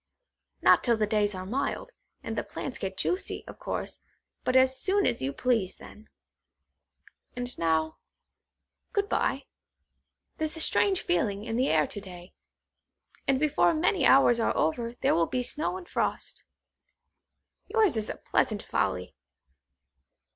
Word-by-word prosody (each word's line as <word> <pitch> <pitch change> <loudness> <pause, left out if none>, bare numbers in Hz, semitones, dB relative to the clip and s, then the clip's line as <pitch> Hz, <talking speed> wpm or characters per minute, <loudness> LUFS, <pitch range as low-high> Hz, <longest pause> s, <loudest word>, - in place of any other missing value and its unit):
Not - - +6
till 235 -2 +3
the 215 - +2
days 210 -1 +1
are 185 0 -5
mild, 275 - -2 0.3
and - - -4
the - - 0
plants 260 - -6
get 190 -1 -4
juicy, 360 - -2
of - - -11
course, - - -4 0.4
but 255 - 0
as 260 0 +4
soon 395 +1 +2
as - - 0
you 135 +1 -1
please 225 - 0
then. 215 +1 -14 1.3
And 245 0 -4
now, 160 -1 +1 1.0
good 405 0 +1
bye. - - 0 0.9
There's 315 +1 -1
a - - -5
strange 380 +3 +2
feeling 210 - 0
in 225 0 -3
the 255 +3 +2
air 155 -1 +4
to 205 - -6
day, 180 -2 -11 0.9
and 270 -1 +3
before 305 +2 +3
many 350 +4 +2
hours 250 -3 +6
are 225 - +1
over 230 +10 0
there - - +3
will 165 -1 +2
be 250 - -1
snow 305 +8 -2
and 365 -2 -10
frost. - - -2 1.2
Yours 435 - +3
is 215 -1 -2
a - - -3
pleasant 210 -2 0
folly. 95 -2 -1
235 Hz, 145 wpm, -28 LUFS, 195-300 Hz, 1.3 s, Not